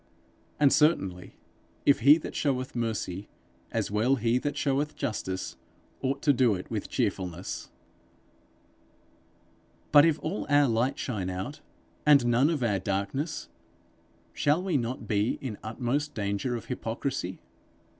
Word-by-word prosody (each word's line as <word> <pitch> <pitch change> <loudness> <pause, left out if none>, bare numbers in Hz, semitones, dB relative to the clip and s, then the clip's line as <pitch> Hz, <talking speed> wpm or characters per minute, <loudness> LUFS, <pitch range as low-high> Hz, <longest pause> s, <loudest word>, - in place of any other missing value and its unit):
And 145 -2 +5
certainly, 95 - +1 0.5
if 140 - +5
he 140 +6 +7
that 165 - -7
showeth 130 -4 -1
mercy, 105 -5 -3 0.4
as - - -2
well 110 +6 +3
he 120 0 +1
that 145 +2 -3
showeth 145 +2 0
justice, 95 -3 -3 0.4
ought 135 +1 -1
to 145 - +5
do 120 -5 +3
it 90 - -8
with - - -3
cheerfulness. 90 -1 -3 2.2
But 145 -1 +9
if 160 -2 +3
all 175 +6 -3
our 145 0 +5
light 120 +3 +1
shine 100 -8 -3
out, 95 +11 -5 0.4
and 145 -4 +6
none 120 +5 +4
of 155 -6 -1
our 105 -5 +1
darkness, 100 - -2 0.9
shall 150 +5 +2
we 185 -4 -1
not 120 -3 -2
be 105 +2 +1
in 120 -6 -6
utmost 130 +6 -2
danger 100 +4 -1
of 115 - -6
hypocrisy? 115 -4 -3
125 Hz, 135 wpm, -28 LUFS, 105-145 Hz, 2.2 s, But